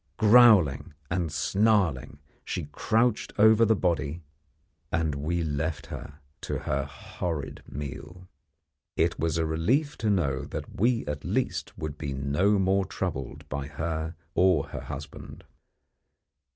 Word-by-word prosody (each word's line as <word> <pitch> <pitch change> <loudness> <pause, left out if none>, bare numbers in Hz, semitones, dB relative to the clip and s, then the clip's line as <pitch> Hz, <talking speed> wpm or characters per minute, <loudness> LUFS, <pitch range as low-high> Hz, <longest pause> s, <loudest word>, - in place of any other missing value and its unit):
Growling 105 - +6 0.2
and 90 -4 -1
snarling, 90 - +1 0.3
she - - -4
crouched 115 0 +1
over 110 +1 +6
the 110 0 +4
body, 85 -4 -1 0.7
and 80 -2 0
we 80 +5 -1
left 80 +1 -2
her 70 - -8 0.3
to - - -3
her 70 +1 -2
horrid 70 +2 -5
meal. 80 +6 -7 0.7
It - - +1
was 80 0 0
a 80 - +1
relief 110 - 0
to 110 - 0
know 70 -10 +1
that - - -7
we 120 0 +2
at 75 -1 -4
least - - -2
would 75 -1 -5
be 70 -3 -3
no 75 +10 +2
more 95 0 +2
troubled 85 -8 -5
by 70 -1 -4
her 80 +2 -3 0.2
or 90 -6 +3
her - - -6
husband. - - -8
80 Hz, 130 wpm, -27 LUFS, 75-100 Hz, 0.7 s, Growling